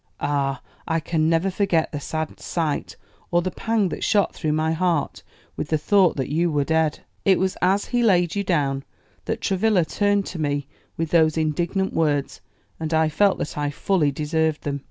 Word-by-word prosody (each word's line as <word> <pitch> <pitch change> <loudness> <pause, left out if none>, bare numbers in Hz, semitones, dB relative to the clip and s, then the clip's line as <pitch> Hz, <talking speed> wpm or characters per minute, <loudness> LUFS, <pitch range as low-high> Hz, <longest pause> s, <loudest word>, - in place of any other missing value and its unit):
Ah, 140 -1 -1 0.2
I 165 0 +1
can 160 0 0
never 165 +4 +2
forget 180 -4 +1
the 145 - -4
sad 155 +1 -4
sight, 160 -4 -2 0.3
or 175 0 +2
the 185 - -2
pang 225 -3 0
that - - -5
shot 205 -2 +2
through 155 -2 -1
my 155 +1 +1
heart 165 -2 0 0.3
with - - -4
the 155 - +2
thought 185 +3 +3
that 135 - -3
you 170 +4 +1
were 145 -1 +1
dead. 160 0 0 0.2
It 190 -2 +4
was 190 0 0
as 190 +3 +2
he 245 0 0
laid 180 -7 +3
you 200 - 0
down 140 -7 0 0.4
that - - -3
Travilla 195 -2 +2
turned 205 +2 +1
to 180 - -6
me 145 -2 -1 0.3
with 165 -1 -2
those 160 -2 +4
indignant 170 +5 0
words, 145 -4 0 0.4
and 160 0 -1
I 160 0 +3
felt 200 +5 +3
that - - -4
I 145 0 0
fully 150 0 +1
deserved 155 +2 -1
them. 140 -1 -2
160 Hz, 190 wpm, -23 LUFS, 150-185 Hz, 0.4 s, It